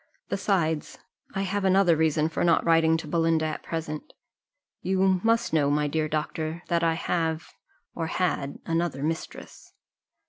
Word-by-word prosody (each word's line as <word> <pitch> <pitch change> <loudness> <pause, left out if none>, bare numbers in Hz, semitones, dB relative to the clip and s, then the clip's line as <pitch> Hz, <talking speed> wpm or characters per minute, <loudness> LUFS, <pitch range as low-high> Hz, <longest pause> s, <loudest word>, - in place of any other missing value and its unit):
Besides, 170 -6 0 0.4
I 195 - 0
have 200 +1 -1
another 190 -2 +4
reason 155 -1 +2
for 160 - -2
not 170 -1 +3
writing 165 -1 +4
to 160 - -7
Belinda 165 0 +1
at 155 -1 -3
present 155 -2 -5 0.7
you 190 0 +2
must 230 -2 +2
know, 145 -3 +3
my 150 +1 +1
dear 155 +1 0
doctor, 155 +2 -3
that 170 0 +1
I 165 -1 +2
have, 160 -1 -2 0.4
or 165 -1 -3
had, 160 -6 -1
another 165 -4 -1
mistress." 160 +1 -5
165 Hz, 145 wpm, -26 LUFS, 155-175 Hz, 0.7 s, another